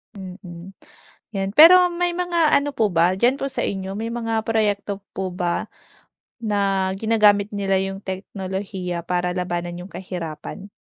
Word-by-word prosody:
Mm, 185 -1 -10 0.6
’yan. 195 -1 -1
Pero 360 +4 +9
may 350 0 0
mga 345 -3 +2
ano 285 +1 -1
po 215 -3 +1
ba 175 +2 +3
diyan 245 +7 +2
po 275 - -1
sa - - -1
inyo, 195 0 -3
may 225 +2 -4
mga 225 -2 -2
proyekto 205 -3 0 0.2
po 190 -1 -3
ba 175 -1 -2 0.7
na 200 -3 0
ginagamit 210 -1 +3
nila 195 -1 0
yung 195 0 -4
teknolohiya 190 -2 -5
para 180 +1 -1
labanan 175 -1 -3
yung 195 - -13
kahirapan? 180 +2 -7
195 Hz, 145 wpm, -22 LUFS, 180-220 Hz, 0.7 s, Pero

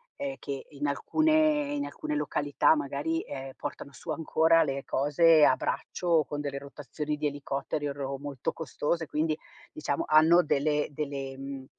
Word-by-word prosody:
ehm, 280 -1 -4
che 140 -1 -5
in 145 0 -3
alcune 305 - +2
in 285 0 -2
alcune 305 +1 -4
località 145 - +2
magari, 150 +3 -2
ehm, 135 -1 -7
portano 145 -1 -6
su 130 - -12
ancora 165 +1 +3
le 135 -2 -3
cose 150 +3 +5
a 130 - +5
braccio 180 - -3
o 165 -3 +4
con 145 +1 -4
delle 140 -1 -4
rotazioni 145 +2 -5
di 150 0 -1
elicotteri 145 +1 -3
o 140 - -3
ro 140 -1 -4
molto 140 -2 -4
costose. 160 +2 -2
Quindi, 155 +1 -1 0.3
diciamo, 145 -2 -2
hanno 160 +3 +6
delle 150 0 +1
delle, 140 -2 -4
mhmm, 135 -1 -7
145 Hz, 165 wpm, -29 LUFS, 140-160 Hz, 0.3 s, hanno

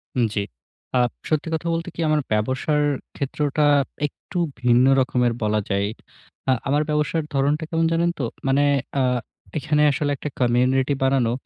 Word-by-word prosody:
হুম, 120 - +3
জি। 100 - +1 0.5
আ - - +4 0.3
সত্যি 155 0 0
কথা 165 +1 -2
বলতে 165 +2 -2
কী? - - -12
আমার 155 -1 +3
ব্যবসার 130 +7 +1 0.3
ক্ষেত্রটা 145 +2 -1 0.4
একটু 175 +4 -7 0.2
ভিন্ন 125 +1 +4
রকমের 125 -3 +1
বলা 105 0 +1
যায়। 100 0 +1 0.6
আ - - +6 0.2
আমার 145 +2 +2
ব্যবসার 150 +1 0
ধরনটা 145 +3 +1
কেমন 165 0 +1
জানেন 170 +1 +2
তো? 135 - -1 0.2
মানে 135 +2 +3 0.4
আ - - +3 0.6
এখানে 150 0 +1
আসলে 145 +1 -1
একটা 150 - -5
কমিউনিটি 130 +3 +2
বানানো। 130 -4 +2
140 Hz, 150 wpm, -23 LUFS, 125-150 Hz, 0.6 s, আ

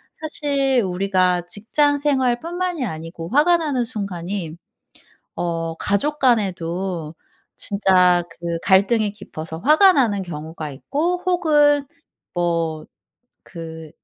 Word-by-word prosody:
사실 280 -5 0
우리가 185 -1 +1
직장 285 +10 +1
생활뿐만이 295 +4 0
아니고 165 -1 -7
화가 310 +7 +4
나는 285 -7 -1
순간이 190 -5 -4 0.8
어 165 -1 -2
가족 250 - 0
간에도 185 - 0 0.4
진짜 185 -3 +3
그 170 0 -4
갈등이 200 +2 +3
깊어서 160 -6 -8
화가 310 - +6
나는 215 -8 +2
경우가 155 -2 -7
있고 330 - -2
혹은 295 -5 +3 0.5
뭐 165 -3 -1 0.6
그 160 -2 -9
200 Hz, 215 characters per minute, -21 LUFS, 170-285 Hz, 0.8 s, 화가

